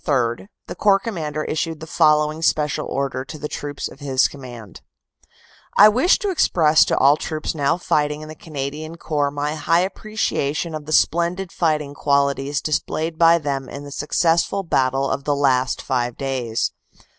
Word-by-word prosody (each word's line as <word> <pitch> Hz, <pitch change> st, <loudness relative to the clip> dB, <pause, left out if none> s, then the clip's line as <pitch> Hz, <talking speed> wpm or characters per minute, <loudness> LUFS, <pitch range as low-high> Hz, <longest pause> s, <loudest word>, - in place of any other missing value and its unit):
3 125 Hz, +1 st, 0 dB, 0.2 s
the -, -, -6 dB
Corps 200 Hz, -2 st, +3 dB
Commander 155 Hz, -8 st, -4 dB
issued 160 Hz, 0 st, -3 dB
the 160 Hz, -, -8 dB
following 150 Hz, 0 st, +2 dB
special 150 Hz, -2 st, 0 dB
order 135 Hz, -1 st, -2 dB
to 135 Hz, +3 st, -9 dB
the 150 Hz, 0 st, -5 dB
troops 145 Hz, -1 st, -5 dB
of -, -, -14 dB
his 135 Hz, -2 st, +2 dB
command: 120 Hz, -8 st, -11 dB, 1.0 s
"I 210 Hz, +2 st, +9 dB
wish 255 Hz, -, +3 dB
to 410 Hz, -, -2 dB
express 160 Hz, -, +4 dB
to -, -, 0 dB
all 140 Hz, +2 st, +5 dB
troops 155 Hz, 0 st, -4 dB
now 145 Hz, 0 st, +1 dB
1 175 Hz, -, -5 dB
fighting 150 Hz, -1 st, 0 dB
in 155 Hz, -, -9 dB
the 155 Hz, -, -8 dB
Canadian 155 Hz, +1 st, -6 dB
Corps 145 Hz, -3 st, -1 dB
my 145 Hz, +1 st, -3 dB
high 160 Hz, +3 st, +2 dB
appreciation 185 Hz, -6 st, -2 dB
of 155 Hz, -1 st, -6 dB
the -, -, -6 dB
splendid 170 Hz, +4 st, +1 dB
fighting 150 Hz, -4 st, -1 dB
qualities 140 Hz, 0 st, 0 dB
displayed 160 Hz, +1 st, -2 dB
by 165 Hz, 0 st, +6 dB
them 140 Hz, -4 st, -3 dB
in 140 Hz, -, -8 dB
the 145 Hz, -, -10 dB
successful 170 Hz, +6 st, +1 dB
battle 135 Hz, -4 st, +1 dB
of 140 Hz, -, -2 dB
the 145 Hz, -, +1 dB
last 130 Hz, -2 st, +1 dB
five 120 Hz, -2 st, -1 dB
days. 130 Hz, -5 st, -2 dB
150 Hz, 170 wpm, -21 LUFS, 140-165 Hz, 1.0 s, I